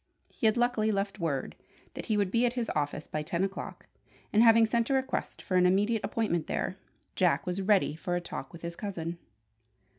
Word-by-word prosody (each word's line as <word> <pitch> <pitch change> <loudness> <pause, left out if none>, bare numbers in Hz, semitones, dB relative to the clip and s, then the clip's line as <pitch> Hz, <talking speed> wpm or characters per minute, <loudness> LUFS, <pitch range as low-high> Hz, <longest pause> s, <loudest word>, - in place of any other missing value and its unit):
He 225 - 0
had 220 - +2
luckily 235 -3 +2
left 200 0 -2
word 150 -6 -2 0.4
that - - -7
he 215 -3 +1
would 200 -2 +1
be 235 +2 +2
at 240 - -2
his 240 -2 -2
office 150 0 -2
by 155 - -3
ten 170 +4 -1
o'clock; 195 0 -5 0.5
and 215 - +5
having 230 -1 +7
sent 235 +2 0
a 270 - +3
request 265 0 -2
for 185 - 0
an 180 0 +5
immediate 205 +4 +2
appointment 190 -8 -1
there, - - -2 0.4
Jack - - +2
was 180 +2 -2
ready 195 -4 +3
for 175 +2 -3
a - - +1
talk 155 -5 -7
with 170 - -12
his 170 0 -5
cousin. 170 -5 -5
195 Hz, 205 wpm, -29 LUFS, 170-225 Hz, 0.5 s, having